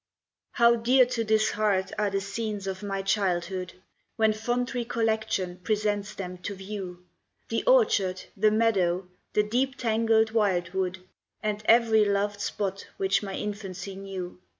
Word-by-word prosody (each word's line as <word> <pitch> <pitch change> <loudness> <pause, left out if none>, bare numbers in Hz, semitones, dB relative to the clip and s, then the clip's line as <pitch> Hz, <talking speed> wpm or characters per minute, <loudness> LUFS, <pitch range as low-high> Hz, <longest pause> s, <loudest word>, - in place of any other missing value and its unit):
How 235 0 +5
dear 250 +3 +5
to 240 -2 -2
this 215 0 +2
heart 200 -3 +1
are 210 -1 +1
the 195 0 0
scenes 205 0 -4
of 190 -1 -4
my 195 -1 -3
childhood, 185 -2 -1 0.4
When 220 -1 +3
fond 240 +4 -2
recollection 220 -6 -1
presents 210 +1 -1
them 180 -2 -6
to 200 +3 -5
view! 190 -2 -7 0.4
The 230 - -1
orchard, 215 - +3
the 215 +2 +4
meadow, 195 -5 +1 0.3
the 210 - +3
deep 255 +5 0
tangled 225 -2 +2
wild 190 -6 +1
wood, 190 -1 -1 0.5
And 210 0 -1
every 225 -1 +5
loved 205 0 0
spot 200 -1 -3
which 195 0 +1
my 195 -2 -5
infancy 200 -2 -5
knew! 190 -2 -7
205 Hz, 145 wpm, -27 LUFS, 190-220 Hz, 0.5 s, How